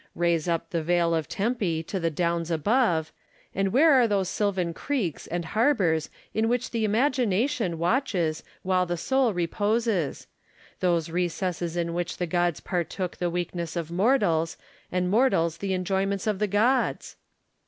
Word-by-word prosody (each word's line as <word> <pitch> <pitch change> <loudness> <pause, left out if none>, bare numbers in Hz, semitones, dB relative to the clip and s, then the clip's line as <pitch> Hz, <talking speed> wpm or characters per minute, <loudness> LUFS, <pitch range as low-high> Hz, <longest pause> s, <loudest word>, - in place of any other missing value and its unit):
Raise 170 -1 +1
up 165 -1 -1
the 170 - 0
vale 170 +1 +2
of 160 -2 -1
Tempe 200 -7 -1
to 190 +3 -4
the 165 -1 0
downs 170 +1 -1
above, 170 - +1 0.4
and 195 0 0
where 305 +6 +5
are 250 -3 +5
those 195 -3 0
sylvan 190 -5 -1
creeks 220 - -3
and 175 0 -3
harbours 195 - +1 0.2
in 220 +1 +1
which 245 +1 -1
the 225 -2 0
imagina 235 -1 +2
tion 225 - -2
watches 175 - 0 0.2
while 185 -1 +1
the 175 0 -2
soul 265 +5 +2
reposes; 205 - 0 0.5
those 170 -3 +1
recesses 175 0 -2
in 170 -1 -1
which 175 0 -3
the 180 - -1
gods 175 -1 0
partook 180 0 -3
the 175 - -1
weaknesses 175 -1 -3
of 165 -1 -4
mortals, 175 -5 +2 0.3
and 180 0 0
mortals 205 -8 +2
the 195 -1 -2
enjoyments 195 +2 -1
of 210 -3 0
the 210 - +1
gods 225 +7 +1
180 Hz, 155 wpm, -26 LUFS, 170-215 Hz, 0.5 s, where